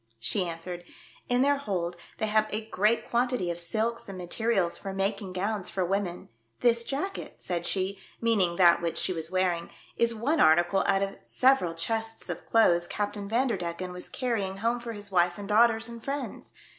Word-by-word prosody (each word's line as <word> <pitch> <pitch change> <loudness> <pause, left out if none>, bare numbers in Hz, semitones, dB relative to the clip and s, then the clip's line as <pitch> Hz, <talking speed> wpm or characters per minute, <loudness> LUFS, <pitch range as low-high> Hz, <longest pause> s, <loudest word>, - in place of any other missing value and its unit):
She 185 - +1
answered, 175 +1 -6 0.5
"In 245 +1 +3
their 285 +1 +3
hold 180 -9 -2 0.2
they - - 0
have 215 0 +2
a 215 +1 -3
great 210 +2 +1
quantity 240 -6 +1
of 170 - -5
silks 220 +6 -2
and 195 - -7
materials 185 0 0
for 195 -1 -6
making 195 0 -2
gowns 200 +1 -2
for 185 -2 -1
women. 185 -1 -2 0.3
This 235 -1 +4
jacket," 290 +11 -4
said 175 -1 -3
she, 195 0 -1 0.2
meaning 205 -7 +2
that 170 -1 +6
which 170 -1 -2
she 185 - +1
was 160 -1 -4
wear 185 0 +2
ing, 170 0 -5 0.3
"is 235 0 +3
one 280 +9 0
article 175 +1 +5
out 195 0 +3
of 195 - -4
several 255 -11 +2
chests 225 +6 -2
of - - -5
clothes 175 -6 +4
Captain 205 -1 -3
Vanderdecken 185 -7 -1
was 180 - -8
carrying 210 -7 -2
home 230 +4 0
for 235 -1 -6
his 205 -1 -7
wife 175 -1 +3
and 200 -1 -7
daughters 225 +1 +4
and 235 -1 -9
friends. 280 +1 -5
200 Hz, 180 wpm, -28 LUFS, 180-230 Hz, 0.5 s, that